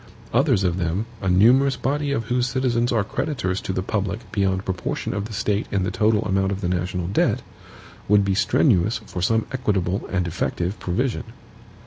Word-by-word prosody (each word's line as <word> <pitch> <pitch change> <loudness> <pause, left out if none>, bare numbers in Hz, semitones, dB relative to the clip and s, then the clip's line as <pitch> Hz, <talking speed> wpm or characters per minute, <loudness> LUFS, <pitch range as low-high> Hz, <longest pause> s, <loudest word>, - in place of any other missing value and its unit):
Others 125 - +3
of 90 -1 +1
them, 90 +5 -1 0.2
a 95 - 0
numerous 125 +9 +5
body 145 +1 -1
of 130 -5 0
whose 125 +2 0
citizens 120 -2 +1
are 110 -4 +2
creditors 100 -4 -2
to - - -3
the 95 0 -2
public 105 +2 -3
beyond 95 -1 0
proportion 90 -2 -3
of 100 - -2
the 110 - -8
State 105 0 -1
in 100 -2 0
the 95 - -1
total 110 0 +2
amount 95 -1 +1
of 100 0 -3
the 90 - -1
national 90 0 -1
debt, 95 - +1 0.6
would 105 -1 +4
be 100 - +1
strenuous 105 - +3
for 90 - -5
some 110 +4 +2
equitable 100 -7 -1
and 90 -2 0
effective 85 +3 -2
provision. 120 +6 -1
100 Hz, 180 wpm, -23 LUFS, 95-120 Hz, 0.6 s, numerous